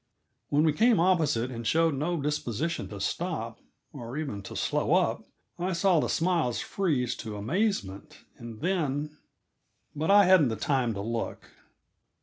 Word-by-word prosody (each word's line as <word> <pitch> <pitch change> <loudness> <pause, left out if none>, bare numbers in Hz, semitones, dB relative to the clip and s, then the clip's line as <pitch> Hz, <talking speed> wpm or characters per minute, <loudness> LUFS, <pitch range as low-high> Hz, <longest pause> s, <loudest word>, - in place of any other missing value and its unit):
When 145 +2 +3
we 155 -2 +3
came 225 +5 +4
opposite 155 -9 +2
and 115 -2 -5
showed 165 +2 +3
no 155 +5 -1
disposition 150 +2 -2
to 100 - -8
stop, 115 - -3 0.3
or 125 -1 -7
even 140 -10 -4
to 100 - -9
slow - - +1
up, - - +1 0.3
I 185 +2 -1
saw 170 0 +3
the - - -1
smiles 165 -8 +1
freeze 145 -11 -1
to 110 -3 -6
amazement, 115 - -2
and 115 -1 -9
then 150 -4 -1 0.8
but 155 +4 -2
I 200 0 +7
hadn't 180 -6 +6
the 110 - -2
time 120 0 0
to 100 - -4
look. 115 +2 -4
150 Hz, 150 wpm, -28 LUFS, 115-170 Hz, 0.8 s, I